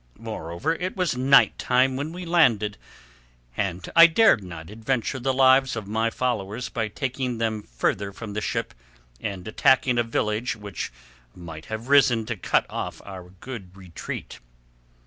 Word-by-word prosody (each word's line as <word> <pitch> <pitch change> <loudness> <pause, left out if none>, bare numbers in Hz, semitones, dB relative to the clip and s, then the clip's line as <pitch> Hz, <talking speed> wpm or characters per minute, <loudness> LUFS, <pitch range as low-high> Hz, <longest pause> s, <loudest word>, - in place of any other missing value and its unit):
Moreover, 110 - -3
it 180 +4 -4
was 180 -8 0
night 135 +2 +4
time 130 +1 +2
when 145 +4 -3
we 180 +1 -7
landed, 120 - +3 0.8
and 95 -3 -3
I 170 0 +10
dared 170 - +4
not 85 -1 -9
adventure 120 +4 -2
the 135 +2 0
lives 130 0 +4
of 110 -3 -5
my 110 +3 0
followers 120 -1 -2
by 110 -2 -2
taking 130 +1 -3
them 110 -2 -1
further 100 +9 -2
from 105 +1 -8
the 105 - -2
ship - - -3 0.5
and 95 0 -5
attacking 125 +2 +3
a - - +3
village 115 +1 -1
which 105 - -6 0.4
might 80 -3 -9
have 110 +2 -6
risen 130 -5 +4
to 115 - -3
cut 95 - +1
off - - -5
our 95 -2 -9
good 95 -1 -10
retreat." 90 -8 -8
115 Hz, 155 wpm, -24 LUFS, 100-130 Hz, 0.8 s, I